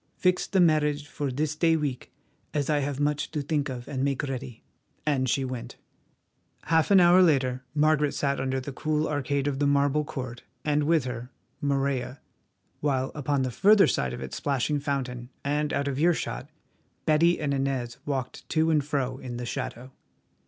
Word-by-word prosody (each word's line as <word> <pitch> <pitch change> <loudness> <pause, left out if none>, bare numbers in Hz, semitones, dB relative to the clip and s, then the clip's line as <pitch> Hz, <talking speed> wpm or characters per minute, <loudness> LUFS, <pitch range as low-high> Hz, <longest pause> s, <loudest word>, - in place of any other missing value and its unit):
Fix 180 0 +2
the 190 - +1
marriage 150 -3 +3
for 145 -1 -3
this 150 +3 -1
day 165 +1 +3
week, 145 -5 -3 0.4
as 145 0 +1
I 150 - +3
have 140 -1 -2
much 150 +1 0
to 150 -3 -3
think 145 -1 -1
of 125 -2 -6
and 135 -2 -2
make 140 0 0
ready," 130 -4 -5 0.4
and 135 -4 +1
she 135 +2 +1
went. 125 -2 -6 0.9
Half 160 -1 +2
an 200 -2 +7
hour 175 +1 +7
later 130 -6 +2
Margaret 150 -1 +3
sat 140 -1 0
under 130 0 -1
the 130 +2 -6
cool 155 +3 0
arcade 140 -1 -1
of 140 -2 -1
the 145 - +2
marble 145 +1 +2
court, 130 -5 -6 0.2
and 150 -1 +2
with 160 -2 +3
her, 125 -1 -5 0.3
Morella, 140 -2 -1 0.6
while 135 -3 0
upon 145 -2 0
the 130 - -1
further 205 - +6
side 65 -2 0
of - - -6
its 65 - -5
splashing 145 +1 0
fountain 125 -4 -3 0.2
and 150 +1 0
out 140 - 0
of 140 -1 -2
earshot, 160 -4 0 0.6
Betty 165 +3 +4
and 145 -2 -1
Inez 135 -3 -2
walked 135 -3 -4
to 160 0 +2
and 150 -2 +3
fro 135 -3 -2
in 120 -2 -6
the 120 - -4
shadow. 125 +2 -5
140 Hz, 180 wpm, -27 LUFS, 130-150 Hz, 0.9 s, an